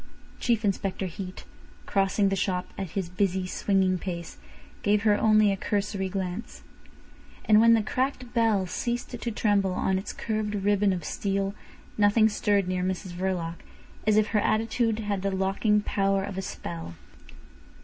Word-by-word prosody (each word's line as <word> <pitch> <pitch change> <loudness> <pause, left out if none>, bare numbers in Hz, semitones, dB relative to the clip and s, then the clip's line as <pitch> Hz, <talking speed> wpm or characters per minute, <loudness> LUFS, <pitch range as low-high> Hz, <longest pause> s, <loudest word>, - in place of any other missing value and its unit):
Chief 230 -3 +1
Inspector 195 -1 -1
Heat, 185 +1 -7 0.4
crossing 195 0 +2
the 195 - 0
shop 180 -1 -1
at 190 -3 -4
his 190 -3 -1
busy, 185 +1 0
swinging 185 0 +1
pace, 170 -2 -6 0.4
gave 205 0 +2
her 210 -2 +4
only 215 -1 +4
a - - +1
cursory 195 -1 -2
glance. 190 +3 -5 0.8
And 215 0 +6
when 230 0 +7
the 220 - +1
cracked 255 +1 -2
bell 225 -5 +2
ceased 240 +6 -3
to 240 -1 -4
tremble 200 -3 +1
on 190 +1 0
its 195 - -6
curved 215 -2 -2
ribbon 205 0 +2
of 175 -4 -3
steel 195 0 -1 0.5
nothing 210 +2 +5
stirred 205 -2 +1
near 185 0 -1
Mrs 185 0 -3
Verloc, 175 -2 -2 0.5
as 215 -1 +4
if 215 -1 +3
her 215 - +2
attitude 225 +1 +1
had 205 -2 -2
the 195 - 0
locking 195 +2 +1
power 195 -1 +1
of 200 -1 -5
a 190 - -2
spell. 85 - -6
200 Hz, 160 wpm, -27 LUFS, 190-215 Hz, 0.8 s, when